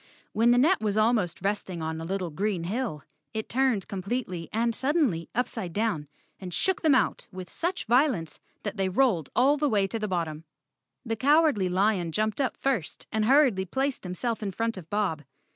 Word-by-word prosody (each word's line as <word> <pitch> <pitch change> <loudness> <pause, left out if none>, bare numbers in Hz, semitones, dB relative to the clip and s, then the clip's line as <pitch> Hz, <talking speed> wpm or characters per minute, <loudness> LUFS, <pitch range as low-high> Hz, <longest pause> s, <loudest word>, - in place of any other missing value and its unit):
When 230 +2 +3
the 240 - +5
net 320 +9 +4
was 210 -1 0
almost 215 -6 +1
resting 195 -3 -2
on 160 0 -3
a - - -5
little 185 -1 -2
green 190 +1 -1
hill, 200 - -3 0.3
it 220 - -3
turned 250 -6 +1
completely 190 -3 -4
and 230 +1 +1
suddenly 260 - 0
upside 225 -7 -2
down, 205 -9 -1 0.3
and 185 -2 -7
shook 380 - 0
them 310 -4 +5
out - - +1
with 185 -1 -8
such 360 +3 -2
violence 240 - +2 0.2
that 205 0 -4
they 190 -1 +1
rolled 185 - +2
all 275 +4 +4
the 295 0 +1
way 205 -4 +2
to 225 +4 -3
the 215 - -2
bottom. 165 -4 -2 0.6
The 225 -1 -1
Cow¬ 295 +7 +5
ardly 210 - +1
Lion 185 -2 +1
jumped 215 - 0
up 265 - -1
first 255 - -2
and 220 -1 +1
hurriedly 255 -7 +4
placed 265 +8 -1
him¬ 180 -1 -6
self 230 +2 -2
in 205 -2 -2
front 230 +3 -1
of 175 -4 -10
Bob. 200 -7 0
215 Hz, 195 wpm, -27 LUFS, 180-250 Hz, 0.6 s, the